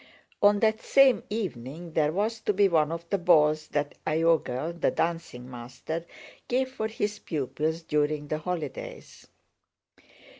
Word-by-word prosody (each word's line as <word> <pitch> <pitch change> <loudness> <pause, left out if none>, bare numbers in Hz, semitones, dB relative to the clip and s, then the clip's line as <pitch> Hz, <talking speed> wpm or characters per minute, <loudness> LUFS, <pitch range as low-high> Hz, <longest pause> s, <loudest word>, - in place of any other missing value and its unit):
On 205 0 +5
that 220 0 +2
same 275 -2 +5
evening 165 - -5
there 150 -1 +2
was 215 +6 -1
to 210 - 0
be 200 +1 +4
one 160 -4 +2
of 170 0 -5
the 200 - +2
balls 155 -3 +4
that 145 -1 -2
Iogel 160 -1 +1
(the - - +4
dancing 165 -7 -2
master) 130 +7 -6 0.4
gave 260 +1 +1
for 220 -4 -2
his 210 -2 -3
pupils 155 +2 -2
during 150 -1 0
the 155 +1 -2
holidays. 155 -5 -6
165 Hz, 140 wpm, -27 LUFS, 150-205 Hz, 0.4 s, On